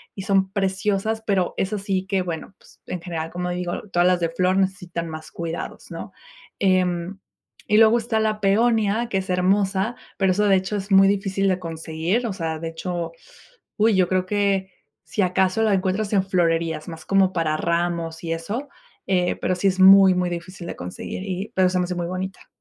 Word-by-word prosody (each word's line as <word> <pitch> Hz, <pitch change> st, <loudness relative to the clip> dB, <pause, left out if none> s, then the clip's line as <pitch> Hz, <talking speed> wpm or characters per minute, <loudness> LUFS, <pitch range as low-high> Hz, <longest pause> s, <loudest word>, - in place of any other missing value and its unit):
y 195 Hz, -, -6 dB
son 195 Hz, -2 st, +2 dB
preciosas. 200 Hz, +3 st, -1 dB
Pero 190 Hz, -4 st, +1 dB
eso 205 Hz, +2 st, -1 dB
sí, 195 Hz, -1 st, -2 dB
que 195 Hz, -1 st, 0 dB
bueno, 170 Hz, +1 st, -5 dB
pues, -, -, -22 dB
en 180 Hz, -, -4 dB
general, 165 Hz, -2 st, -4 dB
como 180 Hz, 0 st, -3 dB
digo, 175 Hz, 0 st, -3 dB
todas 175 Hz, -2 st, +2 dB
las 180 Hz, -1 st, +3 dB
de 170 Hz, -1 st, 0 dB
flor 185 Hz, +3 st, +1 dB
necesitan 180 Hz, -3 st, -1 dB
más 155 Hz, -1 st, -8 dB
cuidados, 170 Hz, 0 st, -6 dB
¿no? -, -, -7 dB, 0.5 s
Em, 185 Hz, -1 st, +1 dB, 0.5 s
y 210 Hz, -, +3 dB
luego 225 Hz, +1 st, +6 dB
está 225 Hz, -1 st, -1 dB
la 215 Hz, -1 st, 0 dB
peonia, 220 Hz, +2 st, +2 dB
que 195 Hz, -, 0 dB
es 190 Hz, -, -7 dB
hermosa, 190 Hz, +4 st, +1 dB, 0.2 s
pero 190 Hz, -2 st, +3 dB
esa, 210 Hz, +2 st, +2 dB
de 195 Hz, -, +6 dB
hecho, 190 Hz, +3 st, -3 dB
es 200 Hz, 0 st, -5 dB
muy 195 Hz, 0 st, +7 dB
difícil 195 Hz, 0 st, 0 dB
de 185 Hz, -, +2 dB
conseguir, 165 Hz, +6 st, -2 dB
o 210 Hz, -, -3 dB
sea, 160 Hz, -4 st, -3 dB
de 165 Hz, -, -4 dB
hecho 170 Hz, 0 st, -4 dB, 0.6 s
uy, 215 Hz, -1 st, +4 dB
yo 185 Hz, -2 st, +3 dB
creo 185 Hz, -1 st, +1 dB
que 195 Hz, -1 st, 0 dB, 0.3 s
si 210 Hz, -, -2 dB
acaso, 185 Hz, +3 st, +2 dB
la 215 Hz, -2 st, +3 dB
encuentras 195 Hz, +3 st, 0 dB
en 195 Hz, -2 st, +3 dB
florerías 165 Hz, -4 st, 0 dB
más 160 Hz, -1 st, -9 dB
como 195 Hz, +1 st, +3 dB
para 165 Hz, -3 st, 0 dB
ramos 170 Hz, 0 st, -1 dB
y 165 Hz, -, -1 dB
eso, 210 Hz, -, -4 dB, 0.4 s
eh, 180 Hz, -2 st, +1 dB
pero 185 Hz, -, -1 dB
sí 180 Hz, +2 st, +1 dB
es 190 Hz, 0 st, 0 dB
muy, 190 Hz, 0 st, +8 dB
muy 180 Hz, 0 st, 0 dB
difícil 175 Hz, +1 st, -7 dB
de -, -, -5 dB
conseguir 90 Hz, -, -6 dB
y 195 Hz, +3 st, -4 dB
pero 185 Hz, -1 st, +4 dB
se 180 Hz, 0 st, 0 dB
me 180 Hz, -, +1 dB
hace 180 Hz, 0 st, -4 dB
muy 175 Hz, -1 st, -2 dB
bonita. 185 Hz, +1 st, -5 dB
185 Hz, 200 wpm, -23 LUFS, 175-195 Hz, 0.6 s, muy